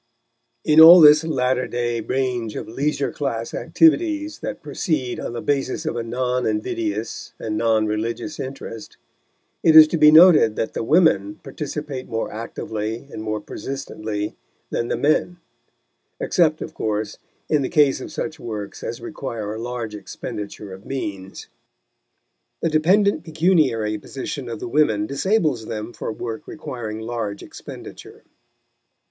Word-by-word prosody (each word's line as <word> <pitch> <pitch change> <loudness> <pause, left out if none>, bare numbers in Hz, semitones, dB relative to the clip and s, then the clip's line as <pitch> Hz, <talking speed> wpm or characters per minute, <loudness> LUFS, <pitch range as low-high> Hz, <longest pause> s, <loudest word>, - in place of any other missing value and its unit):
In 155 0 +5
all 170 +3 +11
this 150 -1 +8
latter 130 -5 0
day 120 -1 -2
range 125 -2 -2
of - - -5
leisure 140 +4 -1
class 115 -5 -3
activities 315 -1 +2
that - - -6
proceed 135 -8 -2
on - - -5
the 120 - -5
basis 135 -2 -1
of - - -2
a 120 - -2
non 125 +2 -1
invidious 110 0 -3
and 110 -1 -4
non 110 -1 +2
religious 115 +8 -3
interest, 130 -4 -7 0.6
it 160 - +4
is 155 -1 +11
to 165 - -1
be 150 0 +8
noted 155 -8 +7
that 110 - -2
the - - -3
women 110 - +3
participate 145 -1 -6
more 115 0 -3
actively 110 +1 -5
and - - -6
more 110 -1 -2
persistently 110 -5 -5 0.4
than 115 - -1
the - - -1
men 155 +4 +1 0.8
except, 160 -3 +1
of - - -9
course, 105 -1 -3 0.3
in 150 -2 +2
the 130 - -2
case 145 -5 +3
of - - -8
such 160 0 -5
works 105 -5 -6
as - - -5
require 105 -2 -5
a 110 - -6
large 120 -2 -5
expenditure 105 -1 -7
of 95 +1 -11
means. 100 -8 -6 1.2
The 165 - +2
dependent 175 +3 +3
pecuniary 155 - +1
position 130 +1 -6
of 115 -2 -5
the - - -5
women 115 -6 +2
disables 140 - 0
them 110 +2 -5
for - - -5
work 110 0 -6
requiring 110 -7 -6
large 110 -3 -4
expenditure. - - -11
125 Hz, 145 wpm, -22 LUFS, 110-155 Hz, 1.2 s, all